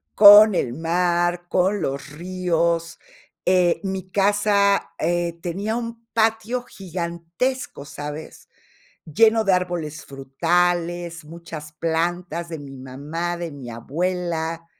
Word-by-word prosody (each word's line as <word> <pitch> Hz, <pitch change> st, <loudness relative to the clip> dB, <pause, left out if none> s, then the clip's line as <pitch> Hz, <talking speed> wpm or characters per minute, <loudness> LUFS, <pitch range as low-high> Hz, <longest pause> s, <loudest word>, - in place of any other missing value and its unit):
con 210 Hz, 0 st, +9 dB
el 120 Hz, -7 st, 0 dB
mar, 175 Hz, +2 st, 0 dB
con 190 Hz, +3 st, +1 dB
los 140 Hz, +2 st, -3 dB
ríos. 170 Hz, 0 st, -1 dB, 0.5 s
Eh, 180 Hz, -2 st, +3 dB
mi 190 Hz, -1 st, -4 dB
casa, 200 Hz, -1 st, +2 dB
eh, 170 Hz, 0 st, -1 dB
tenía 195 Hz, +6 st, -2 dB
un 230 Hz, -1 st, -5 dB
patio 225 Hz, +2 st, +1 dB
gigantesco, 170 Hz, -, -4 dB
¿sabes?, 150 Hz, +2 st, -8 dB, 0.6 s
lleno 220 Hz, +7 st, +3 dB
de 195 Hz, -, +3 dB
árboles 175 Hz, -4 st, -2 dB
frutales, 170 Hz, +4 st, -1 dB
muchas 160 Hz, -1 st, -9 dB
plantas 170 Hz, +1 st, -2 dB
de 160 Hz, -2 st, -6 dB
mi 140 Hz, -1 st, -10 dB
mamá, 150 Hz, +7 st, -4 dB
de 170 Hz, -2 st, -5 dB
mi 130 Hz, -4 st, -9 dB
abuela 165 Hz, +5 st, -3 dB
175 Hz, 110 wpm, -22 LUFS, 160-190 Hz, 0.6 s, con